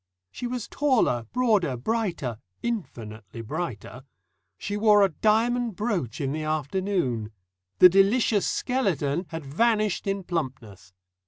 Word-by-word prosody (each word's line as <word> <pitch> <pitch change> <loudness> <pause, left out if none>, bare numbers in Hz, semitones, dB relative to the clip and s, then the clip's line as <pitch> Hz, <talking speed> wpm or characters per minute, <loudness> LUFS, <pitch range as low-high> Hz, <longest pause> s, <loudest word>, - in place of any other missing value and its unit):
She 245 - -5
was 245 -2 -4
taller, 230 - +1
broader, 210 - +2
brighter 165 - -2 0.2
infinitely 115 - -5
brighter. 125 - -5 0.5
She 205 - -4
wore 210 -1 +5
a 195 - +4
diamond 225 +5 +1
brooch 195 - -2
in 135 -2 -1
the 155 +2 -3
afternoon. 155 - -1 0.5
The 180 - +10
"delicious 200 +3 +3
skeleton" 180 - -1
had 160 -3 -6
vanished 210 +6 +1
in 195 0 -1
plumpness. 130 - -5
180 Hz, 115 wpm, -26 LUFS, 130-220 Hz, 0.5 s, The